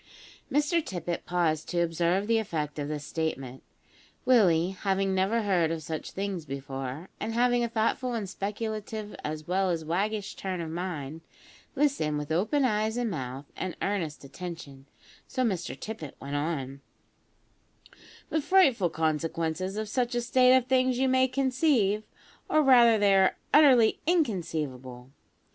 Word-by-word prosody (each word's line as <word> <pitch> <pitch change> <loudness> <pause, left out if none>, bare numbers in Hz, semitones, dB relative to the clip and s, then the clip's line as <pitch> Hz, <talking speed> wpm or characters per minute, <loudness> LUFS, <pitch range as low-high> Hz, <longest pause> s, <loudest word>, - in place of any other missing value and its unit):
Mr 300 +4 +2
Tippet 175 -5 -4
paused 165 -3 0
to 175 - 0
observe 170 +3 +1
the 225 +1 +2
effect 155 -8 -3
of 145 - -2
this 150 -1 -4
statement. 135 -6 -4 0.6
Willie 185 -8 +4
having 195 0 0
never 195 +5 +1
heard 180 -5 +2
of 165 -1 -3
such 155 +1 -5
things 195 -3 -4
before, 135 +2 -6
and 225 +2 -3
having 245 0 +3
a 235 - -1
thoughtful 235 +2 0
and 215 -4 -3
speculative 215 +1 -5
as 155 0 -5
well 190 +1 +1
as 165 -2 -2
waggish 200 +5 -1
turn 190 -2 -4
of 165 -2 -4
mind, 165 -3 -5 0.5
listened 265 - +1
with 150 +1 -5
open 220 - +2
eyes 215 -1 0
and 240 -3 -1
mouth 135 -3 -5
and 185 -2 -4
earnest 175 -8 -2
attention, 140 -3 -9 0.4
so 255 - -1
Mr 180 - -2
Tippet 210 -11 -7
went 140 +1 -5
on: 140 -3 -3 1.5
"The 315 - +1
frightful 280 - +4
consequences 165 +3 -2
of 215 0 -2
such 245 +2 -1
a 240 - +1
state 255 +2 +5
of 255 - 0
things 255 -1 +2
you 265 +1 +2
may 260 0 +4
conceive, 255 -5 +1 0.5
or 310 - +4
rather 240 -4 +6
they 205 -1 +4
are 190 -1 +3 0.2
utterly 260 -7 +6
inconceivable. 150 - -2
190 Hz, 150 wpm, -28 LUFS, 160-235 Hz, 1.5 s, rather